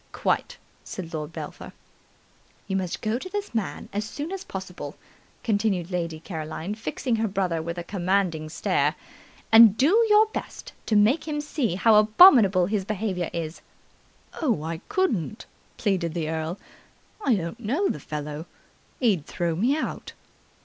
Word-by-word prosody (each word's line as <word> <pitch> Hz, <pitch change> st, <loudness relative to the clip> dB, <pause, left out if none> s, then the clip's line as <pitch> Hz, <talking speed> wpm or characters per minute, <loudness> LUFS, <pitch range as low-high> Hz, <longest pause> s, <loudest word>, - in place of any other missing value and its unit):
"Quite!" -, -, -1 dB, 0.3 s
said 170 Hz, -3 st, -7 dB
Lord 155 Hz, 0 st, -4 dB
Belpher. -, -, -8 dB, 0.9 s
"You 195 Hz, -, -2 dB
must 185 Hz, -2 st, -2 dB
go 220 Hz, +2 st, 0 dB
to 370 Hz, -, -7 dB
this 410 Hz, -5 st, -4 dB
man 220 Hz, -4 st, -3 dB
as 205 Hz, +1 st, -1 dB
soon 290 Hz, -, -6 dB
as 390 Hz, -1 st, -5 dB
possible," 180 Hz, -, -7 dB, 0.5 s
continued 200 Hz, -5 st, 0 dB
Lady 170 Hz, -3 st, -2 dB
Caroline, 160 Hz, +2 st, -5 dB
fixing 225 Hz, -, -2 dB
her 225 Hz, 0 st, +1 dB
brother 185 Hz, -5 st, -1 dB
with 170 Hz, +2 st, -5 dB
a 175 Hz, -, -4 dB
commanding 180 Hz, -4 st, 0 dB
stare, 155 Hz, -, +1 dB, 0.6 s
"and 225 Hz, -2 st, +8 dB
do 370 Hz, -, +5 dB
your 420 Hz, +1 st, +7 dB
best 440 Hz, -, -7 dB
to 220 Hz, -, +2 dB
make 230 Hz, +11 st, +3 dB
him 300 Hz, -1 st, -2 dB
see 295 Hz, -, -1 dB
how 215 Hz, +3 st, +5 dB
abominable 215 Hz, -, +7 dB
his 200 Hz, +1 st, -1 dB
behaviour 190 Hz, -3 st, -2 dB
is." 165 Hz, -1 st, -5 dB, 0.8 s
"Oh, 235 Hz, -, +1 dB
I 165 Hz, 0 st, -4 dB
couldn't!" 260 Hz, -, -1 dB, 0.3 s
pleaded 185 Hz, -6 st, 0 dB
the 160 Hz, -2 st, -2 dB
earl. 160 Hz, +3 st, -3 dB, 0.7 s
"I 255 Hz, -, +3 dB
don't 175 Hz, +4 st, -4 dB
know 270 Hz, -, 0 dB
the -, -, -2 dB
fellow. 150 Hz, +2 st, -6 dB, 0.5 s
He'd 200 Hz, -, +1 dB
throw 170 Hz, -2 st, -1 dB
me 245 Hz, -, +2 dB
out." -, -, -4 dB
195 Hz, 150 wpm, -25 LUFS, 170-230 Hz, 0.9 s, and